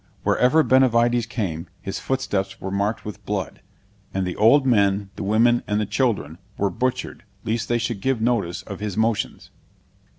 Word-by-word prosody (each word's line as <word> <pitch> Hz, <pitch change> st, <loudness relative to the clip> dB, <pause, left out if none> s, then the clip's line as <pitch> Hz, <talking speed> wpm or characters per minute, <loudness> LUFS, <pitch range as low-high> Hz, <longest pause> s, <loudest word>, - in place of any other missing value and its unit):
Whereever 150 Hz, +6 st, +4 dB
Benavides 120 Hz, -3 st, +3 dB
came, 95 Hz, -9 st, -3 dB
his -, -, -5 dB
footsteps 100 Hz, -8 st, -2 dB
were 95 Hz, -, -5 dB
marked 100 Hz, +3 st, -1 dB
with 105 Hz, -, -8 dB
blood, 100 Hz, -3 st, -4 dB, 0.5 s
and 95 Hz, -1 st, 0 dB
the 90 Hz, -, -3 dB
old 130 Hz, +6 st, +5 dB
men, 100 Hz, -5 st, +2 dB
the -, -, -7 dB
women, 115 Hz, +4 st, +3 dB
and 105 Hz, 0 st, 0 dB
the 105 Hz, -, 0 dB
children, 105 Hz, -, -1 dB, 0.2 s
were 100 Hz, -1 st, 0 dB
butchered 125 Hz, +5 st, -2 dB, 0.2 s
lest 115 Hz, +1 st, -2 dB
they 120 Hz, -, +2 dB
should 115 Hz, -3 st, -3 dB
give 135 Hz, +1 st, 0 dB
notice 110 Hz, -7 st, 0 dB
of 100 Hz, -, -8 dB
his 105 Hz, -2 st, -4 dB
motions. 110 Hz, -1 st, -1 dB
110 Hz, 165 wpm, -23 LUFS, 100-120 Hz, 0.5 s, old